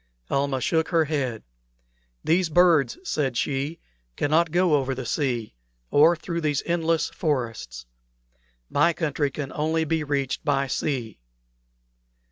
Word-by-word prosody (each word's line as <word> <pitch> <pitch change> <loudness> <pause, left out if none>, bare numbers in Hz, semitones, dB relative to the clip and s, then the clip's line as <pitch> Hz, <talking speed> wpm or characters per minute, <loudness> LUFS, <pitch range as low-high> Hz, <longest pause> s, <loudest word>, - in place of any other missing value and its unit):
Almah 140 -1 0
shook 160 +3 +1
her 165 -2 +3
head. 135 -7 -2 0.8
"These 175 +1 +2
birds," 170 - +4
said 140 - -1
she, 140 +5 -1 0.4
"cannot 160 +3 +2
go 175 0 +2
over 135 -2 +1
the 130 -1 -5
sea, 120 -4 -1 0.4
or 160 +4 +6
through 170 +1 -4
these 150 -3 0
endless 165 -1 0
forests. 120 - -3 0.8
My 150 - +3
country 150 -3 -1
can 135 0 -6
only 160 +2 0
be 160 0 0
reached 140 -2 -2
by 140 -1 +1
sea." 125 - -3
150 Hz, 125 wpm, -25 LUFS, 135-165 Hz, 0.8 s, or